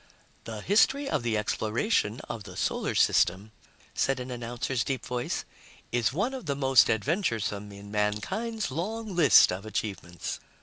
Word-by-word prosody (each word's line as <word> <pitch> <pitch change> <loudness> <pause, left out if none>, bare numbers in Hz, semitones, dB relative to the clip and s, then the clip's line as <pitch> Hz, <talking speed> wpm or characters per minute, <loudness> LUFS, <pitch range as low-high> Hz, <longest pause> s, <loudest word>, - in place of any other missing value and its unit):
"The 110 -2 -6
history 270 - +3
of - - 0
the 115 -2 0
exploration 110 - 0
of 110 - -7
the - - -10
Solar - - -1
System," 95 +5 +3 0.4
said 135 -1 +1
an 125 0 -6
announcer's 120 0 -2
deep 135 +2 -3
voice, 125 -1 -3 0.5
"is 120 -1 +1
one 200 - -1
of 255 -10 -7
the 140 - 0
most 135 -3 +5
adventuresome 110 - -1
in 100 0 -11
mankind's 110 - -1
long 210 +7 -4
list 155 -6 +7
of 90 +2 -4
achievements. 95 -5 -4
120 Hz, 145 wpm, -28 LUFS, 105-170 Hz, 0.5 s, list